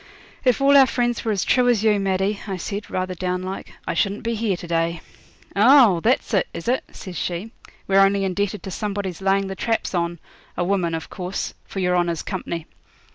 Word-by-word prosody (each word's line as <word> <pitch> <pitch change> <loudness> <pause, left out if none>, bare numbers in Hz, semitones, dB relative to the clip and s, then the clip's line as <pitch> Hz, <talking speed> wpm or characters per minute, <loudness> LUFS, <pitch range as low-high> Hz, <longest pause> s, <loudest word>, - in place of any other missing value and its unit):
'If 250 -1 +3
all 280 +1 +5
our 270 -1 +7
friends 240 -1 0
were 225 - 0
as 200 -3 0
true 250 -1 +3
as 225 -4 +2
you, 210 -2 +3
Maddie,' 195 +1 0
I 195 -2 -3
said, 200 +3 -5
rather 185 0 -2
down 180 0 -2
like, 190 +1 -6 0.2
'I - - 0
shouldn't 200 +1 0
be 230 0 -1
here 215 -4 0
to 175 - -9
day.' 165 0 0 0.6
'Oh! 225 -3 +6
that's 240 +4 +1
it, 195 - +2
is 170 - -6
it?' 255 +2 +1
says 185 -3 -9
she; 180 +6 -3 0.4
'we're 195 0 +4
only 195 0 +4
indebted 200 +2 -1
to 190 - -6
somebody's 200 -3 -3
laying 195 +1 +2
the 195 0 -5
traps 225 +1 -1
on 170 -1 -1 0.4
a 175 - +1
woman 175 -3 0
of 160 - -7
course 185 0 -4
for - - -10
your 180 -1 +2
honour's 170 -2 0
company. 170 -4 -4
195 Hz, 205 wpm, -22 LUFS, 180-215 Hz, 0.6 s, our